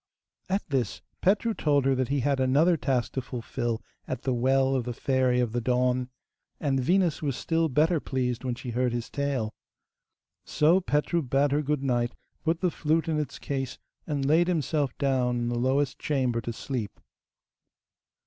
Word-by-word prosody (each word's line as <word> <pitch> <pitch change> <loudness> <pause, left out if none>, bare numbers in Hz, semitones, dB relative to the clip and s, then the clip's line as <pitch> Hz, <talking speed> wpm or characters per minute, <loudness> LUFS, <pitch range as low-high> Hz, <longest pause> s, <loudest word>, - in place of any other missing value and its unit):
At 195 +2 0
this, 130 -7 -1 0.2
Petru 210 +4 +2
told 145 -7 +2
her 135 - +4
that 130 -1 0
he 140 0 0
had 140 +1 +1
another 145 +7 +4
task 130 -5 0
to 130 - -2
fulfil 120 -2 -3 0.2
at - - -4
the 130 - +1
well 130 +2 +2
of 130 -2 +1
the 120 - -3
Fairy 130 -2 +2
of 120 -3 +1
the 120 +1 -1
Dawn, 125 +1 +1 0.5
and 135 -3 +1
Venus 175 +4 +2
was 140 -4 -1
still 165 -1 +1
better 155 +4 +3
pleased 125 -3 -2
when 125 -2 -1
she 125 0 -6
heard 125 +1 0
his 120 +1 -4
tale. 135 -6 -1 0.9
So 160 +5 +3
Petru 165 +1 +1
bade 135 +1 +1
her 145 +1 +2
good 150 -1 -1
night, 120 -2 0 0.3
put 165 +1 0
the 180 -2 +2
flute 160 0 0
in 155 -2 +1
its 150 - -4
case, 135 -2 -3 0.3
and 145 -3 -1
laid 160 +5 +4
himself 150 -5 0
down 130 -3 +1
in 120 0 -1
the 120 0 -1
lowest 135 +2 +1
chamber 130 -5 0
to 120 - -4
sleep. 115 -2 -5
135 Hz, 175 wpm, -27 LUFS, 125-150 Hz, 0.9 s, her